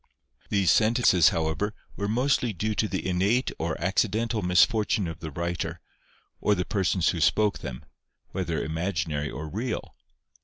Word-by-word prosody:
These 95 -5 +3
sentences, 110 -6 +5
however, 85 +6 -1 0.2
were 100 - -2
mostly 125 +1 +1
due 110 +4 -1
to 105 +2 0
the 95 -2 -3
innate 100 +8 +1
or 80 0 -2
accidental 110 +5 0
misfortune 100 +3 +3
of 80 0 -6
the 80 -2 -6
writer, 85 +1 -3 0.6
or 105 - +2
the 90 -1 -2
persons 95 -3 +1
who 85 - -1
spoke 105 +5 +2
them, 65 -2 -7 0.5
whether - - -2
imaginary 80 -3 -2
or 80 +1 -6
real. 110 +8 -4
95 Hz, 145 wpm, -26 LUFS, 85-110 Hz, 0.6 s, sentences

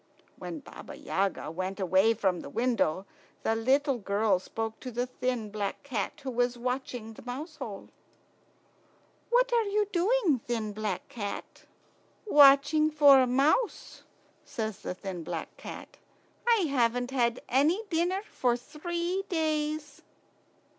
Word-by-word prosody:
When 315 - -7
Baba - - -11
Yaga 190 -5 -2
went 185 +4 -4
away 190 +4 +3
from 190 -4 0
the - - -8
window, 210 - 0 0.4
the 225 - +1
little 265 +3 +2
girl 200 -1 +1
spoke 225 +3 -5
to 255 - -6
the 245 +1 -1
thin 250 -4 -3
black 205 +3 -3
cat 245 -8 -3
who 265 - -3
was 245 0 0
watching 250 -2 -4
the - - -12
mouse 295 +6 -7
hole. - - -7 1.4
"What - - +3
are 470 - +5
you 415 +1 +1
doing, 370 - +2
thin 225 -3 -3
black 210 -3 -3
cat?" 205 -4 -7 0.6
"Watching 295 -2 +6
for 290 -3 +7
a 255 - +3
mouse," 285 - +1 0.4
says 220 -3 -4
the - - -5
thin 185 -3 -6
black - - -5
cat. - - -10 0.5
"I 460 -3 +5
haven't 245 -5 +1
had 240 -2 +1
any 305 - +2
dinner 355 +4 +1
for 245 -2 0
three 345 +7 -3
days." 305 -3 -1
250 Hz, 135 wpm, -29 LUFS, 220-310 Hz, 1.4 s, for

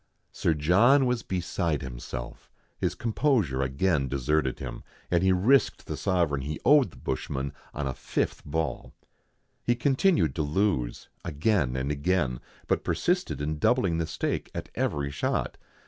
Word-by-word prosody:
Sir 80 - +1
John 110 - +5
was 125 -2 0
beside 85 -6 -2
himself; - - -7 0.3
his - - 0
composure 110 - +1
again 70 +2 +1
deserted 70 +1 0
him, 65 -3 -6 0.3
and 85 -1 +3
he 95 0 +4
risked 110 +10 +3
the - - -4
sovereign 85 -8 +1
he 75 +3 -4
owed 145 -7 +6
the 70 - -17
bushman 65 +2 -3 0.2
on 75 - -4
a 65 - -1
fifth - - -2
ball. 80 0 -3 0.7
He 120 - +2
continued 130 - +2
to - - +1
lose 75 -6 0 0.2
again 75 - +1
and 65 +2 -1
again, 75 -4 0 0.3
but - - 0
persisted 180 - 0
in 75 +1 -2
doubling 95 - +2
the 80 - -1
stake - - -2
at - - -5
every 70 -1 -1
shot. 70 - -2
80 Hz, 145 wpm, -27 LUFS, 70-100 Hz, 0.7 s, owed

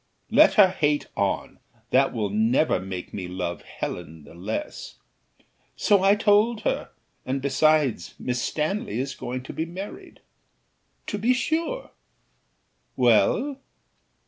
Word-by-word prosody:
"Let - - +6
her 200 -4 +7
hate 150 -5 0
on, - - -2 0.3
that 135 +1 +4
will 105 -4 -2
never 115 +8 +2
make 95 -1 -7
me 95 -3 -5
love 90 -1 -4
Helen 80 -1 -7
the - - -14
less." 95 +6 -5 0.8
"So 200 -2 +3
I 195 +1 +5
told 210 +2 +3
her; - - -1 0.3
and 130 +2 -2
besides, 140 - +2
Miss 125 -1 -2
Stanley 195 +9 -2
is 135 +1 -2
going 125 +1 -5
to - - -8
be 160 - -3
married." 190 +4 -9 0.8
"To 205 - -3
be 245 +5 +3
sure; 335 - -2 1.0
well?" 290 - +3
150 Hz, 125 wpm, -25 LUFS, -, 1.0 s, her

